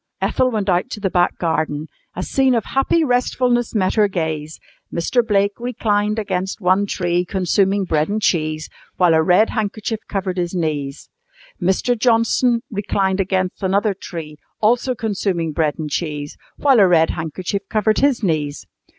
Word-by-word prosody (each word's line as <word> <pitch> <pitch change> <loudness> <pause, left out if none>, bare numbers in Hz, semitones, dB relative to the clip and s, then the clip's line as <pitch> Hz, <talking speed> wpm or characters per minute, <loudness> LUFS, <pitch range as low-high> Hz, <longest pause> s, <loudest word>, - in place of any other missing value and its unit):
Ethel 255 - +1
went 215 -4 -2
out 180 -1 +1
to - - -6
the 195 -2 -1
back 175 -1 +2
garden. 155 -3 -1 0.3
A 180 - -3
scene 265 +2 +2
of 225 - 0
happy 270 +5 +1
restfulness 245 -2 +1
met 185 -3 +1
her 210 -2 +4
gaze. 160 -4 -3 0.3
Mr. 235 +9 +1
Blake 200 -2 +2
reclined 215 -3 0
against 190 -3 -2
one 190 +1 +2
tree 175 -2 0
consuming 195 +2 +1
bread 155 -1 0
and 210 +1 0
cheese, 155 -5 0 0.3
while 175 -3 +4
a 160 - +4
red 180 +7 +3
handkerchief 215 0 -2
covered 190 -2 -2
his 175 0 -2
knees. 150 -4 -3 0.5
Mr. 190 +7 +1
Johnson 235 +1 +2
reclined 195 -2 0
against 185 -1 -1
another 200 +2 +1
tree, 165 -5 -8 0.2
also 245 +4 +2
consuming 195 -8 -1
bread 150 -1 0
and 155 -2 -5
cheese, 150 -2 -3 0.2
while 270 -5 +4
a 195 - +6
red 165 -2 +4
handkerchief 175 +5 -3
covered 215 0 +1
his 275 -5 +2
knees. 150 -5 -1
190 Hz, 160 wpm, -20 LUFS, 170-220 Hz, 0.5 s, a